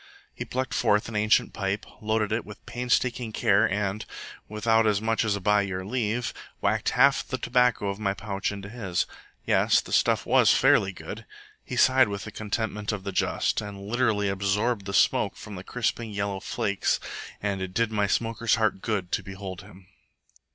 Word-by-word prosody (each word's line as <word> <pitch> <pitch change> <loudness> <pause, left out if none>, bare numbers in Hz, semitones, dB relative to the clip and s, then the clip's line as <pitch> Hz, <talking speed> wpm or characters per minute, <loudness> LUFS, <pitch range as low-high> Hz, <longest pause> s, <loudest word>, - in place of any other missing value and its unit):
He - - -6
plucked 130 0 -3
forth 105 0 +2
an 110 - -7
ancient 105 +1 +3
pipe, 100 +1 -2 0.2
loaded 110 -1 0
it 110 +1 0
with 105 -1 -12
painstaking 125 -1 0
care, 110 0 +3
and, 105 +1 -1 0.5
without 110 +1 +2
as 105 -2 +2
much 115 +1 0
as 105 -2 0
by 105 +1 +3
your 95 -2 -4
leave, 120 +1 -1 0.3
whacked - - +1
half - - +5
the - - -2
tobacco 125 -4 +2
of 100 +1 -3
my 100 -2 0
pouch 100 0 -3
into 100 -1 -7
his. 100 -5 -2 0.4
Yes, - - +4
the - - -7
stuff - - +3
was - - +5
fairly 95 - +4
good. 95 - -9 0.4
He - - -6
sighed 130 -1 +5
with 100 -1 -4
the 110 - -7
contentment 105 0 -3
of 105 -3 -5
the 100 - -4
just, - - 0
and 100 -1 -8
literally 110 -3 +1
absorbed 100 +2 0
the 100 - -4
smoke - - +3
from 105 - -10
the 90 -1 -7
crisping 115 +1 -2
yellow 100 -1 -2
flakes, 100 +1 -1 0.4
and 100 -2 -2
it 95 -1 -4
did 115 +3 0
my 105 -2 +1
smoker's 115 +2 +1
heart 110 -4 0
good 100 -6 -2
to - - 0
behold 95 -1 -7
him. 95 +1 -15
105 Hz, 180 wpm, -26 LUFS, 100-115 Hz, 0.5 s, half